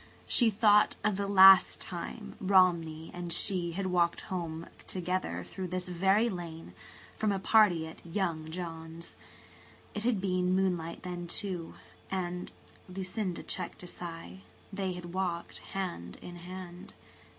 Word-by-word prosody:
She 235 -3 +4
thought 210 0 +5
of 210 -1 +2
the 200 +1 -2
last 195 -1 +8
time 195 +4 -6
Romney 170 -5 +3
and 175 -1 -5
she 175 -1 +2
had 195 +2 -2
walked 175 -2 +2
home 170 -3 -4 0.2
together 180 - -2
through 185 - -6
this 180 0 -3
very 195 +6 +3
lane, 170 - -6 0.4
from 215 -1 +1
a 195 - 0
party 190 -5 +4
at 160 - -11
"young" 165 -3 -2
John's. 165 -1 -7 0.8
It 210 - -3
had 235 -4 +2
been 185 -1 +1
moonlight 175 -3 -1
then, 175 -1 -5
too, 175 -2 -4 0.3
and–Lucinda 185 +1 -5
checked 180 0 -4
a - - -8
sigh–they 170 - -7
had 175 -1 -8
walked 180 -3 -2 0.2
hand 175 - -4
in 175 0 -9
hand. 180 0 -9
180 Hz, 130 wpm, -31 LUFS, 170-190 Hz, 0.8 s, last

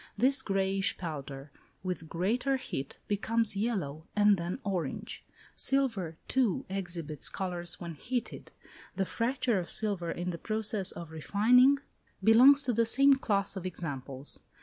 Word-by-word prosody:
This 265 +2 +4
greyish 195 -3 0
powder, 145 -4 -6 0.3
with 180 -4 -4
greater 240 +10 0
heat, 135 - -6
becomes 220 +1 +1
yellow, 185 -9 -2
and 210 0 +5
then 175 +2 -4
orange. 180 -8 -4 0.3
Silver, 225 -12 -1
too, 250 -8 +1
exhibits 170 -6 -1
colours 175 -2 -4
when 170 -2 -6
heated; 240 - -5 0.4
the 195 - 0
fracture 240 0 0
of 175 - -6
silver 200 -6 -1
in 175 +2 -3
the 170 - -6
process 215 -3 0
of 170 -2 -9
refining 240 - +4 0.5
belongs 260 +7 +7
to 250 - 0
the 230 +1 +3
same 275 +4 +5
class 205 -7 0
of 190 - -5
examples. 140 -5 -5
195 Hz, 135 wpm, -30 LUFS, 170-230 Hz, 0.5 s, belongs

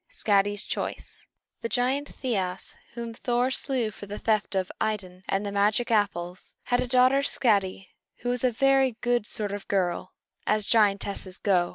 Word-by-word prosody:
SKADI'S 205 -1 +1
CHOICE - - -4 0.3
The 230 - -2
giant 260 +4 0
Thiasse, 190 -7 -2 0.2
whom 235 -1 -5
Thor 245 +2 0
slew 255 -5 -1
for 205 - -10
the 205 +1 -5
theft 215 -3 0
of 190 -1 0
Idun 190 -4 -2
and 195 +2 0
the 200 - -2
magic 210 +4 +2
apples, 185 -4 -1
had 245 0 +1
a - - 0
daughter, 255 +2 +5
Skadi, 200 -8 +1 0.3
who 245 - -2
was 245 0 -1
a 255 - +5
very 270 +1 +3
good 240 -3 +1
sort 210 -2 -2
of 205 0 -6
girl, 185 -2 0 0.3
as 215 -1 +2
giantesses 200 -3 +1
go. 180 -4 +2
215 Hz, 165 wpm, -27 LUFS, 195-245 Hz, 0.3 s, daughter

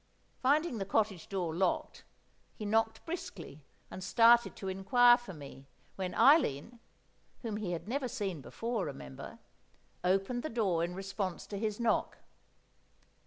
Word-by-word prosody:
Finding 285 -1 +2
the 195 - -2
cottage 200 -3 0
door 180 -5 -2
locked, 180 +1 -1 0.5
he 215 - -6
knocked 225 +1 0
briskly 185 - -7 0.3
and 185 - -7
started 235 +4 +5
to 195 - -7
inquire 220 +6 +5
for 240 -5 -8
me, 140 -4 -11 0.3
when 185 -2 -4
Eileen 240 - +4 0.6
(whom 220 -3 -3
he 195 -5 -3
had 170 - -5
never 260 +3 -1
seen 200 - -4
before, 230 - -3
remember) 65 -1 -8 0.7
opened 195 +7 +1
the 310 - -4
door 195 -8 +1
in 175 +1 -3
response 195 -1 -4
to 205 - -7
his 215 0 -2
knock. 235 -1 0
205 Hz, 140 wpm, -32 LUFS, 180-235 Hz, 0.7 s, started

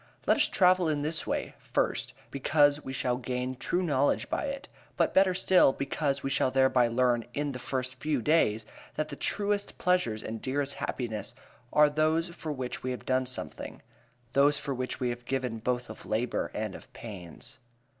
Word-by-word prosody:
Let - - +4
us - - +4
travel 180 -3 +4
in 145 -2 0
this 155 +1 +1
way; - - -2
first, - - -1 0.2
because 145 +1 +3
we 130 - -5
shall 125 -1 0
gain 125 0 -3
true 175 +8 -1
knowledge 145 -4 +1
by - - 0
it, 275 0 -5 0.3
but - - +2
better 190 -1 +4
still, 180 -6 +5
because 140 0 -1
we 135 - -1
shall 130 - +2
thereby 130 -2 +4
learn 120 0 +2
in 145 0 -1
the 125 - -6
first 130 0 -3
days 140 -6 +2 0.3
that 155 0 -2
the 140 - -5
truest 205 +5 -1
pleasures 180 -13 +1
and 110 - -4
the - - -23
dearest 140 +1 0
happinesses 115 -2 -4 0.4
are 150 0 +6
those 155 +3 +1
for 165 -2 -6
which 130 -3 -4
we 130 - -3
have 125 - -5
done 130 0 +1
something; 125 - -3 0.5
those 140 +1 +4
for 145 -1 -3
which 130 0 -3
we 125 - 0
have 120 0 -5
given 125 -3 -2
both 125 +2 -1
of 110 - -10
labor 115 +3 -1
and 105 -2 -3
of - - -12
pains. 105 +4 -9
135 Hz, 185 wpm, -29 LUFS, 125-155 Hz, 0.5 s, are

